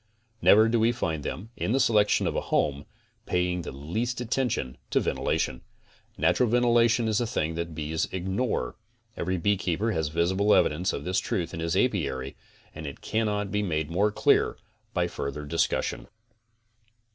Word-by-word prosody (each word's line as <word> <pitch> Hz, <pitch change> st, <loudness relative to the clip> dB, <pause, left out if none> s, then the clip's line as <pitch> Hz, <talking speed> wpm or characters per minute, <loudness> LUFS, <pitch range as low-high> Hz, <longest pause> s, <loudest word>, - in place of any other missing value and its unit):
Never 110 Hz, +1 st, +7 dB
do 115 Hz, +1 st, +2 dB
we 115 Hz, +2 st, +4 dB
find 80 Hz, -10 st, -2 dB
them, 105 Hz, -, -5 dB
in 110 Hz, -, -1 dB
the 135 Hz, -, +2 dB
selection 105 Hz, -5 st, +3 dB
of -, -, -1 dB
a -, -, 0 dB
home, 70 Hz, -1 st, +1 dB, 0.4 s
paying 90 Hz, 0 st, 0 dB
the -, -, -6 dB
least 90 Hz, -, -3 dB
attention 120 Hz, -, -1 dB
to -, -, +2 dB
ventilation. 65 Hz, -, -1 dB, 0.6 s
Natural 125 Hz, -, +3 dB
ventilation 120 Hz, -1 st, +3 dB
is 110 Hz, +1 st, +1 dB
a 120 Hz, -, 0 dB
thing 80 Hz, -7 st, -1 dB
that 85 Hz, +1 st, -2 dB
the 85 Hz, -, -11 dB
bees 80 Hz, +2 st, -2 dB
ignore. 95 Hz, -, -2 dB, 0.4 s
Every 95 Hz, +1 st, -1 dB
beekeeper 95 Hz, +2 st, 0 dB
has 80 Hz, -6 st, 0 dB
visible 95 Hz, +6 st, +2 dB
evidence 90 Hz, +5 st, +2 dB
of -, -, -5 dB
this 95 Hz, +1 st, 0 dB
truth 90 Hz, -5 st, -2 dB
in -, -, -5 dB
his 85 Hz, +2 st, -1 dB
aipary 70 Hz, -, 0 dB, 0.4 s
and 80 Hz, -, -7 dB
it 70 Hz, -, -8 dB
cannot 105 Hz, -3 st, -1 dB
be 105 Hz, 0 st, 0 dB
made 80 Hz, -5 st, -1 dB
more 100 Hz, +5 st, +2 dB
clear -, -, +2 dB, 0.4 s
by 90 Hz, -1 st, +2 dB
further 75 Hz, -2 st, -5 dB
discussion. 85 Hz, +2 st, -1 dB
95 Hz, 165 wpm, -27 LUFS, 80-110 Hz, 0.6 s, Never